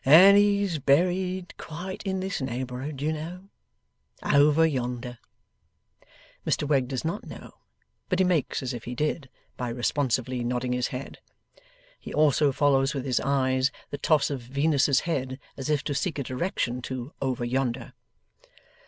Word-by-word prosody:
And 180 +8 +9
he's 200 -4 +3
buried 180 +6 +1
quite 180 +4 -6
in 190 -1 -1
this 190 -4 -3
neighbourhood, 130 +2 -4
you 155 +1 +1
know. 175 +5 -7 0.7
Over 150 +2 +5
yonder.' 125 -4 -3 1.2
Mr 145 - 0
Wegg 135 -4 +2
does 130 +2 -4
not 170 +6 -3
know, - - -11 0.5
but 185 - +1
he 190 - +4
makes 165 -6 0
as 125 - -3
if 120 -2 -7
he 125 - -5
did, 150 -1 -2 0.3
by 125 -1 -3
responsively 125 0 0
nodding 125 +1 -1
his 125 -1 0
head. 130 +1 -7 0.8
He - - -9
also 150 -1 +4
follows 135 +1 +2
with 135 -1 -3
his 130 -3 +1
eyes, 130 -1 +2 0.2
the 145 - -4
toss 150 -1 +2
of 135 -3 -3
Venus's 140 +2 +2
head: 130 -5 -2 0.2
as 135 +1 -5
if 150 -2 +1
to 145 - -2
seek 160 +3 -1
a 140 - -1
direction 125 - -2
to 130 +2 -6
over 130 -3 -1
yonder. 125 -1 -2
140 Hz, 155 wpm, -27 LUFS, 130-160 Hz, 1.2 s, And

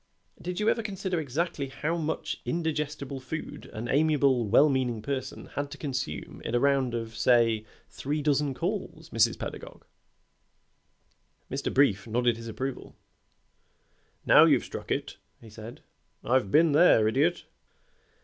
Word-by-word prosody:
Did 180 +2 -4
you 210 - 0
ever 230 - +2
consider 190 -4 -3
exactly 150 0 -2
how 150 +5 -3
much 160 -2 -3
indigestible 150 -4 -3
food 145 +5 -7
an 115 +2 -5
amiable, 140 -4 +2
well 130 +8 +6
meaning 125 -6 -1
person 135 -1 -4
had 145 0 -3
to 145 - -9
consume 125 - -5
in 115 - -2
a - - +3
round 135 -3 +2
of, 115 -1 -5
say, 115 -1 +3 0.2
three 145 +2 -3
dozen 145 -2 +1
calls, 170 -2 -4
Mrs. 115 0 +3
Pedagog?" - - -8 1.7
Mr. 135 +2 -2
Brief 120 -7 +2
nodded 120 +1 +1
his 115 0 -9
approval. 130 +4 -5 1.3
"Now - - +8
you've - - +3
struck - - -8
it," - - -2 0.2
he 110 - -14
said. 110 +2 -10 0.4
"I've 125 -4 +1
been 160 +7 +4
there, 145 -8 +5
Idiot." 145 +10 +1
135 Hz, 140 wpm, -28 LUFS, 120-155 Hz, 1.7 s, Now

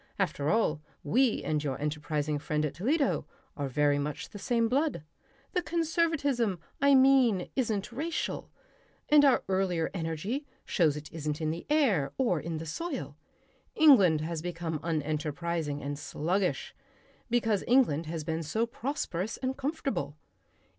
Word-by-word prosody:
After 145 +1 0
all, 160 -8 +2 0.2
we 240 - +2
and 155 -1 -1
your 135 -3 -2
enterprising 150 0 -2
friend 150 +1 -1
at 150 - -3
Toledo, 275 - 0 0.3
are 145 -2 -2
very 145 +2 +2
much 145 +1 -4
the 205 - -9
same 230 0 +1
blood. 275 - 0 0.5
The 360 - +1
conservatism, 315 - 0 0.2
I 280 0 +6
mean, 260 -8 +4
isn't 220 -5 -1
racial. 310 +7 -3 0.6
And 295 -1 +7
our 275 -3 +4
earlier 185 -4 0
energy 190 - -3 0.2
shows 155 -6 +2
it 150 0 -9
isn't 150 -2 -3
in 155 -1 0
the 165 +2 -6
air 220 - +2
or 235 -11 +2
in 165 +1 -4
the 160 - -6
soil. 230 - -4 0.6
England 200 - +6
has 160 0 -3
become 170 -2 -3
unenterprising 155 -1 -2
and 145 0 -4
sluggish 180 +6 -1 0.6
because 225 -4 +1
England 200 - +3
has 160 -1 -4
been 160 +1 -2
so 220 +9 0
prosperous 225 - -3
and 260 0 -2
comfortable...." 275 - -3
175 Hz, 140 wpm, -29 LUFS, -, 0.6 s, And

